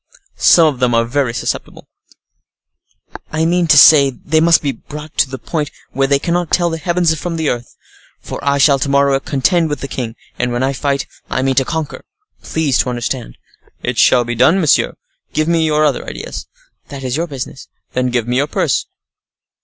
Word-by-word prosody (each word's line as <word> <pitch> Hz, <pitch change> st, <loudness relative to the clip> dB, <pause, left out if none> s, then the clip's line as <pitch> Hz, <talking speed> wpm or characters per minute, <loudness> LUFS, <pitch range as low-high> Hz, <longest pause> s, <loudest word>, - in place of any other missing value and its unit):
some 170 Hz, -, +6 dB
of 145 Hz, -5 st, 0 dB
them 125 Hz, -2 st, +2 dB
are 115 Hz, 0 st, +2 dB
very 130 Hz, +1 st, 0 dB
susceptible." 115 Hz, -, -5 dB, 1.4 s
"I 160 Hz, +1 st, 0 dB
mean 175 Hz, +1 st, +1 dB
to 150 Hz, -, +5 dB
say 145 Hz, -1 st, +8 dB
they 155 Hz, +4 st, -1 dB
must 165 Hz, 0 st, +4 dB
be 140 Hz, -, 0 dB
brought 150 Hz, +2 st, -10 dB
to 135 Hz, -, +3 dB
the 130 Hz, -, -6 dB
point 150 Hz, +1 st, -3 dB, 0.2 s
where 135 Hz, 0 st, 0 dB
they 140 Hz, 0 st, +3 dB
cannot 170 Hz, +3 st, -1 dB
tell 175 Hz, -1 st, +1 dB
the 165 Hz, -, -4 dB
heavens 170 Hz, 0 st, +1 dB
from 165 Hz, +2 st, -4 dB
the 160 Hz, -2 st, -1 dB
earth; 120 Hz, -1 st, -5 dB, 0.4 s
for -, -, -8 dB
I 140 Hz, 0 st, +1 dB
shall 140 Hz, 0 st, +4 dB
to 140 Hz, -, -1 dB
morrow 140 Hz, -1 st, +3 dB
contend 160 Hz, +5 st, +1 dB
with 145 Hz, -, -3 dB
the 140 Hz, -, -4 dB
king; 120 Hz, -4 st, -5 dB, 0.2 s
and 125 Hz, 0 st, 0 dB
when 120 Hz, +1 st, -1 dB
I 135 Hz, +1 st, 0 dB
fight 140 Hz, 0 st, -1 dB, 0.2 s
I 130 Hz, -, -1 dB
mean 135 Hz, 0 st, +1 dB
to 135 Hz, 0 st, +2 dB
conquer—please 160 Hz, -, -4 dB
to -, -, +1 dB
understand." 120 Hz, -, -4 dB, 0.5 s
"It 125 Hz, -2 st, -2 dB
shall 125 Hz, 0 st, +4 dB
be 120 Hz, -, -3 dB
done, 130 Hz, +11 st, +3 dB
monsieur. 155 Hz, -6 st, +2 dB, 0.4 s
Give 155 Hz, 0 st, 0 dB
me 165 Hz, -1 st, +2 dB
your 155 Hz, 0 st, +2 dB
other 145 Hz, -, 0 dB
ideas." -, -, -7 dB, 0.4 s
"That 140 Hz, -2 st, -8 dB
is 130 Hz, -1 st, -2 dB
your 165 Hz, +3 st, -1 dB
business." 135 Hz, -2 st, -7 dB, 0.3 s
"Then 125 Hz, 0 st, 0 dB
give 120 Hz, -2 st, -1 dB
me 125 Hz, +1 st, 0 dB
your 140 Hz, +2 st, +1 dB
purse." -, -, -1 dB
140 Hz, 195 wpm, -16 LUFS, 130-160 Hz, 1.4 s, say